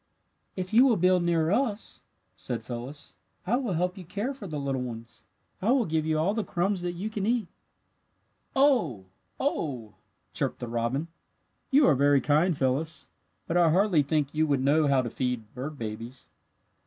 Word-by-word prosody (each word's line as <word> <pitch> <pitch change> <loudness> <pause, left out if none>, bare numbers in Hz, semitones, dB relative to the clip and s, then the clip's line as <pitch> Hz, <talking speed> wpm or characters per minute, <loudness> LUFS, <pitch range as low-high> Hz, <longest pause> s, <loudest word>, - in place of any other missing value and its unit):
"If 185 +1 -5
you 240 +3 +7
will 235 -5 +3
build 185 +1 +4
near 170 -1 +1
us," 220 -2 0 0.3
said - - -3
Phyllis, 125 +5 -7 0.3
"I 210 +6 +2
will 245 -8 -2
help 180 +3 -1
you - - -8
care 205 - -3
for 230 -7 -9
your 155 -3 -4
little 135 -2 -2
ones. 115 -1 -8 0.4
I 205 - 0
will 260 -4 +2
give 160 -2 -1
you 155 -1 +1
all 170 +6 +1
the 220 -1 -1
crumbs 185 +1 -1
that 175 0 -2
you 185 +5 -4
can 205 -2 -2
eat." 230 -4 +1 1.1
"Oh! 240 - +3 0.3
oh!" 130 - -2 0.4
chirped - - -1
the 120 - -6
robin; 120 +6 -1 0.6
"you 285 +1 +5
are 155 - +6
very 140 +1 +4
kind, 155 +4 +2
Phyllis, 140 +4 -1 0.4
but 170 - 0
I 170 -2 +5
hardly 180 -1 +4
think 145 0 0
you 155 +1 +2
would 140 -3 +1
know 150 +2 +3
how 135 -2 +3
to 120 - -3
feed 125 -4 -3
bird 140 +4 -6
babies. 115 -3 -6
155 Hz, 180 wpm, -28 LUFS, 130-190 Hz, 1.1 s, you